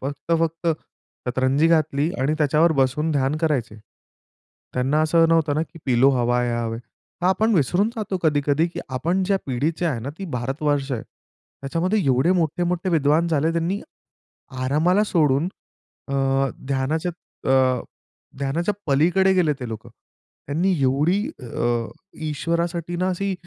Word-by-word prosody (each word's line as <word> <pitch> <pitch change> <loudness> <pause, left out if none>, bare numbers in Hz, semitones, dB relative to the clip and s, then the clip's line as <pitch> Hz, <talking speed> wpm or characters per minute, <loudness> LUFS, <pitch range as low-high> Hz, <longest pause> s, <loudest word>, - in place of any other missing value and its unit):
फक्त-फक्त 165 +4 -1 0.6
शतरंजी 130 +4 +2
घातली 155 -1 +2
आणि 145 +4 +1
त्याच्यावर 155 +2 +3
बसून 150 +5 0
ध्यान 140 0 +1
करायचे. 135 -10 -1 1.0
त्यांना 135 +4 +1
असं 165 +1 +4
नव्हतं 160 -3 +2
ना 155 - +1
की 165 - -10
"पिलो 130 +1 +4
हवा 125 -1 +1
हे 120 - 0
हवाय" 115 -1 -2 0.4
हां. 180 - +2
आपण 220 +4 +2
विसरून 180 - +2
जातो 210 -3 -2
कधी-कधी 145 0 +2
की 170 - -6
आपण 170 +9 0
ज्या 195 +1 +2
पिढीचे 150 +7 -1
आहे 130 -8 -1
ना 130 +5 -5
ती 195 - -5
भारतवर्ष 140 +3 -1
आहे. 115 - -2
त्याच्यामध्ये 175 +8 -4
एवढे 135 +7 +3
मोठे-मोठे 175 +1 0
विद्वान 160 +1 +2
झाले 160 0 +1
त्यांनी 170 +4 -1 0.8
आरामाला 165 +10 +3
सोडून 155 -5 +2 0.6
अ, 140 - -4 0.5
ध्यानाच्या 145 +6 -1 0.4
अ, 130 -2 +3 0.6
ध्यानाच्या 160 +9 -1
पलीकडे 180 +7 +3
गेले 170 -5 +2
ते 125 - -5
लोकं. 110 -1 -7 0.6
त्यांनी 170 +7 +1
एवढी 145 +9 +2 0.2
अ, 120 -1 -1 0.4
ईश्वरासाठी 170 +3 -2
ना 185 +1 0
अशी 195 +1 -1
155 Hz, 135 wpm, -23 LUFS, 135-170 Hz, 1.0 s, असं